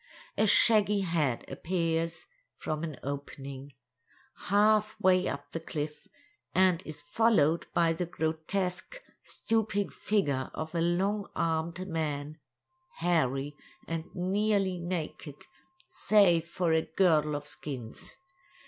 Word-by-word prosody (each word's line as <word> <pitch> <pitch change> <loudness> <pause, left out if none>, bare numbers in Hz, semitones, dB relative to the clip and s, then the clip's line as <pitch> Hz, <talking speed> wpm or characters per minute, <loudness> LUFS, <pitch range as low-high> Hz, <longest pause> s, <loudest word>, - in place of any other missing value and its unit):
A 215 - +2
shaggy 210 -1 +5
head 160 -9 0
appears 165 -1 -2 0.3
from 155 0 -3
an 155 -5 -5
opening, 140 0 -6 0.7
half 215 +1 +3
way 185 -2 +3
up 145 0 -5
the 165 - -3
cliff, 150 -2 -5 0.5
and 185 -2 +4
is 150 -1 -8
followed 170 -2 +2
by 165 -1 +3
the 170 +1 -3
grotesque, 180 - -2 0.2
stooping 215 -3 -1
figure 145 -11 -1
of 155 +1 -5
a 170 - 0
long 195 +5 0
armed 165 +2 -1
man, 155 -2 -3 0.6
hairy 145 -4 0 0.3
and 165 -1 -3
nearly 195 0 +1
naked, 170 -4 -4 0.5
save 175 -6 +3
for 170 -1 0
a 160 - +4
girdle 155 -5 +2
of 145 0 -5
skins. 135 - -8
165 Hz, 110 wpm, -30 LUFS, 150-190 Hz, 0.7 s, shaggy